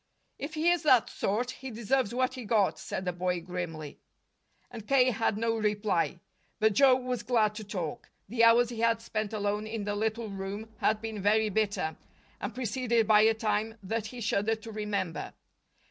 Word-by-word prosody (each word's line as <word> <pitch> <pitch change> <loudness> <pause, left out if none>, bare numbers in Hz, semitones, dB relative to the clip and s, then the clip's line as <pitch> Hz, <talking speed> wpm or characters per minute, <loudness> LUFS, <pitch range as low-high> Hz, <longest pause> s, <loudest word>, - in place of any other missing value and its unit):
"If 300 +3 -5
he 325 +3 +3
is 350 - +1
that 260 -7 +4
sort, 240 +5 -1
he 265 +1 -8
deserves 235 0 0
what 255 +1 0
he 255 -2 -7
got," 210 -3 +2
said 190 - -5
the 180 - -1
boy 180 0 -1
grimly. 165 -4 -6 0.7
And 225 -3 -9
K. 260 -2 +4
had 220 -1 0
no 230 +1 0
reply. 210 -5 0 0.4
But 220 -1 +3
Joe 265 +2 +6
was 250 -1 -3
glad 220 -3 +2
to 215 0 -7
talk. 185 -7 -5 0.2
The 230 +3 +1
hours 230 +1 +6
he 235 -2 -6
had 230 0 +2
spent 215 -2 -3
alone 210 0 -1
in 220 -1 -4
the 205 0 -2
little 220 +2 -2
room 200 +3 -6
had 215 0 +1
been 220 -2 -4
very 215 +2 +3
bitter, 200 -6 -1 0.4
and - - -5
preceded 235 -2 0
by 210 -1 +6
a 220 +1 +4
time 220 0 -1
that 220 +3 -2
he 245 +2 -8
shuddered 220 0 0
to 225 - -7
remember. 205 -5 -3
220 Hz, 185 wpm, -29 LUFS, 205-235 Hz, 0.7 s, Joe